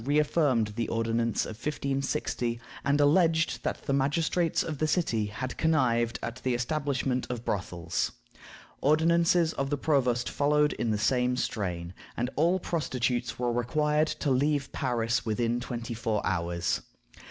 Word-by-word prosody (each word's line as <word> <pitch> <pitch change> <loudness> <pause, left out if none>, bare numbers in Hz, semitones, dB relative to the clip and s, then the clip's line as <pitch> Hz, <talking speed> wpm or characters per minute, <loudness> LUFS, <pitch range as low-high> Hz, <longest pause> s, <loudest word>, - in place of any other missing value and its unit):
reaffirmed 145 -5 +2
the 115 - 0
ordinance 115 0 0
of 110 - -6
1560, 135 -3 -2 0.2
and 140 +1 +2
alleged 160 +2 +3
that - - -3
the 140 - -1
magistrates 160 +5 +1
of 155 -4 -5
the 155 - +1
city 120 - +1
had 120 +5 -5
connived 120 -8 +2
at 120 - -4
the 125 0 -1
establishment 130 -1 -1
of 120 -1 -5
brothels. 90 -4 -2 0.7
Ordinances 165 +2 +3
of 135 0 -2
the 145 - 0
provost 125 -5 +1
followed 150 +1 +2
in 115 - -2
the 105 - +1
same 125 +3 +1
strain, 90 -7 -3 0.2
and 125 +2 -1
all 170 +5 +3
prostitutes 125 -8 -1
were 120 -1 0
required 150 +6 +1
to 145 - -1
leave 140 +1 +1
Paris 120 -3 0
within 115 +2 0
twenty 120 -1 -5
four 110 -2 -1
hours. 85 0 -1
125 Hz, 140 wpm, -28 LUFS, 115-150 Hz, 0.7 s, alleged